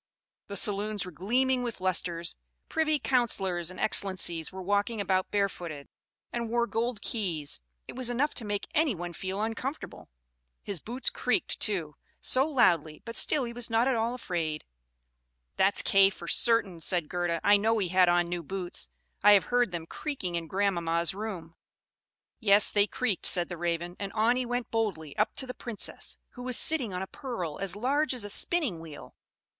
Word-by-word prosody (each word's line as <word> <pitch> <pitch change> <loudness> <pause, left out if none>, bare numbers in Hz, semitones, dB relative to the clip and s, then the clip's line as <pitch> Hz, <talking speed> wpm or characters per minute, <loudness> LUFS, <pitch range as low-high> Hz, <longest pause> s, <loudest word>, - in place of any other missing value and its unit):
The 200 - -6
saloons 205 0 +1
were 180 - -8
gleaming 250 - +1
with 240 -4 -4
lustres 175 -2 -1 0.3
privy 310 -1 +2
councillors 195 - +1
and 185 - -9
excellencies 180 -6 +1
were 190 0 -7
walking 205 +4 0
about 185 -1 0
barefooted, 175 -8 -2 0.4
and 235 -1 -2
wore 235 +1 +2
gold 230 -1 -2
keys; 165 - -2 0.3
it - - -8
was 255 -1 0
enough 265 +5 0
to 240 - -3
make 205 -1 -3
any 300 -7 +2
one 175 0 -6
feel 190 +3 -4
uncomfortable. 250 +6 -5 0.5
His 200 -4 -2
boots 245 - 0
creaked, - - 0
too, 170 -8 -1 0.2
so 265 +3 +4
loudly, 170 - +2
but 230 0 -7
still 295 -3 +2
he 235 -1 -5
was 240 -1 -1
not 225 +2 +2
at 265 - +3
all 230 +2 0
afraid." 165 -9 -3 0.9
"That's 195 +1 +3
Kay 195 0 +6
for 175 -3 -10
certain," 210 -8 +2
said 170 -2 +2
Gerda. 175 -1 -1
"I 205 0 +6
know 225 +2 +2
he 190 -4 0
had 185 0 +5
on 175 0 +3
new 175 0 -3
boots; 175 - -4 0.3
I 205 +1 +8
have 200 - +6
heard 245 -4 +3
them 170 -2 -4
creaking 225 - -4
in 170 -1 -3
grandmama's 170 -2 0
room." 190 -6 -6 0.9
"Yes, 205 -3 +5
they 205 0 +4
creaked," 220 -4 0
said 175 -2 +2
the 175 - -5
Raven. 175 +1 -2
"And 200 -1 -4
on 225 +3 +3
he 255 -1 -1
went 245 0 -3
boldly 190 -10 -2
up 215 - +1
to 265 - 0
the 250 - -6
Princess, 235 -5 -2
who 250 - -11
was 250 -1 0
sitting 280 -10 +2
on 180 +1 -3
a - - -3
pearl 190 - -5
as 195 -1 -1
large 270 +6 +1
as 240 - -1
a 205 - -4
spinning 280 - +1
wheel. 160 -3 -11
200 Hz, 180 wpm, -29 LUFS, 175-235 Hz, 0.9 s, I